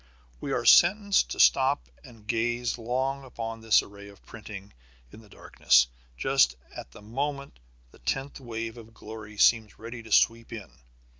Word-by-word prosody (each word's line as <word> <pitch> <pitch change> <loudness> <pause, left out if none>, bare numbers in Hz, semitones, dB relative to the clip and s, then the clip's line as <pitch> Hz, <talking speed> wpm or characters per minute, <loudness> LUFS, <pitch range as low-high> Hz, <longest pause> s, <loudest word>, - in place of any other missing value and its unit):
We - - -5
are - - -1
sentenced 200 +3 +5
to - - -6
stop 135 +2 +3 0.2
and 115 -6 -16
gaze 120 +2 -1
long 130 +4 -2
upon 115 -3 -7
this 110 -1 +4
array 100 0 -13
of 100 -1 -17
printing 105 -3 -11 0.4
in 110 - -13
the 110 - -20
darkness, 65 -9 +2 0.3
just 60 +1 +2 0.2
at - - -9
the 80 - -15
moment 140 - -5 0.3
the - - -20
tenth 135 - -4
wave 115 -2 -6
of 115 0 -15
glory 105 -1 -10
seems 110 -1 +3
ready 115 +1 -8
to 110 -1 -14
sweep 115 +2 +2
in. 105 - -9
115 Hz, 160 wpm, -27 LUFS, 105-130 Hz, 0.4 s, sentenced